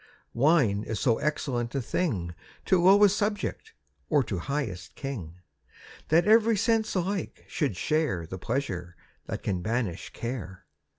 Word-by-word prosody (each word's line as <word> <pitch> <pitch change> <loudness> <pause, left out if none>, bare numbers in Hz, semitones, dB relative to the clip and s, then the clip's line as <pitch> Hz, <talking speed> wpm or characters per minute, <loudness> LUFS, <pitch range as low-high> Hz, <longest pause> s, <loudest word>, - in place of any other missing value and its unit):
Wine 130 -7 +3
is 110 0 -4
so 115 -4 +2
excellent 125 -5 -2
a - - +1
thing 110 - -1 0.3
To 185 -2 +3
lowest 200 +2 +6
subject, 205 -1 -2 0.4
or 145 - +4
to 100 -6 -3
highest 110 - -4
king, 110 - -6 0.7
That 165 +3 +4
every 220 +1 +5
sense 225 +1 +1
alike 190 +2 -2
should 145 - -1
share 150 - 0
The 95 +3 -7
pleasure 90 -7 -3 0.3
that - - -5
can 90 -3 -1
banish 110 -3 -2
care. 115 -7 -6
135 Hz, 135 wpm, -28 LUFS, -, 0.7 s, lowest